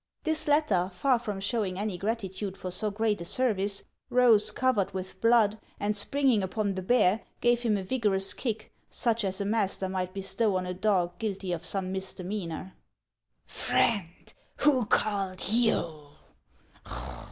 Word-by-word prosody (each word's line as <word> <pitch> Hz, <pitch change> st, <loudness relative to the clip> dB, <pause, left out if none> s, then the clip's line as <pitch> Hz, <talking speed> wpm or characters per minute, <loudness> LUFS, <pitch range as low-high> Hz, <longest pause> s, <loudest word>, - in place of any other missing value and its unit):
This 315 Hz, -1 st, 0 dB
latter, 220 Hz, -, +2 dB
far 245 Hz, +7 st, +2 dB
from 210 Hz, -4 st, -4 dB
showing 195 Hz, -2 st, -1 dB
any 205 Hz, -1 st, -2 dB
gratitude 195 Hz, -1 st, -3 dB
for 185 Hz, -, -5 dB
so 215 Hz, +4 st, 0 dB
great 210 Hz, -1 st, 0 dB
a -, -, -5 dB
service, 200 Hz, -3 st, 0 dB, 0.3 s
rose, 240 Hz, -4 st, +5 dB
covered 230 Hz, -7 st, 0 dB
with 185 Hz, 0 st, -6 dB
blood, 225 Hz, -2 st, +4 dB, 0.2 s
and 205 Hz, +1 st, 0 dB
springing 255 Hz, +1 st, +2 dB
upon 200 Hz, +2 st, -1 dB
the 190 Hz, -, -4 dB
bear, 210 Hz, 0 st, +3 dB, 0.2 s
gave 240 Hz, 0 st, +3 dB
him 225 Hz, -4 st, +1 dB
a 195 Hz, -, -4 dB
vigorous 195 Hz, -3 st, 0 dB
kick, 225 Hz, -4 st, -4 dB, 0.2 s
such 230 Hz, -2 st, 0 dB
as 190 Hz, 0 st, -2 dB
a 200 Hz, -, -1 dB
master 200 Hz, -2 st, 0 dB
might 185 Hz, -1 st, -2 dB
bestow 195 Hz, +2 st, 0 dB
on 185 Hz, 0 st, -1 dB
a 180 Hz, -, -3 dB
dog 185 Hz, -2 st, 0 dB
guilty 195 Hz, -4 st, -3 dB
of 170 Hz, -1 st, -3 dB
some 185 Hz, +1 st, -3 dB
misdemeanor. 190 Hz, -1 st, -5 dB, 0.4 s
" -, -, -52 dB
Friend, 180 Hz, -6 st, -1 dB, 0.2 s
who 260 Hz, -7 st, +3 dB
called 195 Hz, -4 st, 0 dB
you? 170 Hz, -10 st, +2 dB
205 Hz, 150 wpm, -28 LUFS, 185-230 Hz, 0.4 s, rose